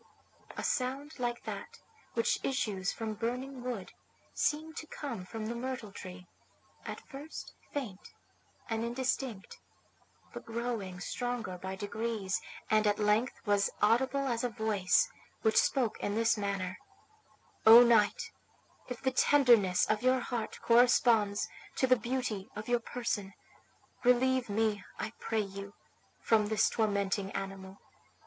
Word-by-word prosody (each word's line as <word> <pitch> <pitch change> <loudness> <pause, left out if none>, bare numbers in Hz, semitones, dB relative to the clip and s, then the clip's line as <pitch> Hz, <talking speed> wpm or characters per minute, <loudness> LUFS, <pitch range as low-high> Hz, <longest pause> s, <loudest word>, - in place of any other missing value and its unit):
A - - -3
sound 275 +3 -2
like 240 -1 -2
that - - -6 0.4
which 230 - +1
issues 210 -8 -1
from 220 -1 -4
burning 250 +4 -3
wood 240 -7 -5 0.4
seemed 315 +2 -1
to 315 - -6
come 240 -13 -5
from 225 0 -5
the 230 - -2
myrtle 245 -3 -4
tree, 185 -2 -9 0.6
at - - -5
first 290 +3 -9 0.2
faint 225 -10 -5 0.6
and 225 0 -1
indistinct, 240 -3 -2 0.7
but - - -7
growing 225 -6 -4
stronger 245 -1 -3
by 190 +1 -5
degrees, 205 -1 -2 0.3
and 215 0 +3
at 205 0 +2
length 215 +4 +2
was 205 -1 +3
audible 260 +6 +3
as 235 -2 -1
a 245 - +1
voice 220 - +2 0.4
which 220 -1 +3
spoke 250 -6 0
in 205 - -2
this 230 +1 +3
manner: 195 -3 -3 0.9
"O 230 +2 +11
knight, 225 -4 +3 0.6
if 250 0 -6
the 260 - +2
tenderness 240 -9 +5
of 215 0 0
your 255 +1 +3
heart 235 -2 -4
corresponds 230 -3 +4 0.3
to - - +2
the 255 0 +5
beauty 235 -4 -3
of 210 +1 -6
your 240 0 +2
person, 230 -4 -3 0.7
relieve 250 0 +3
me, 210 -1 0
I 220 - -4
pray 225 -1 0
you, 200 0 -7 0.4
from 215 -2 +3
this 215 -1 +2
tormenting 200 -2 0
animal. 195 0 -6
225 Hz, 135 wpm, -32 LUFS, 205-250 Hz, 0.9 s, O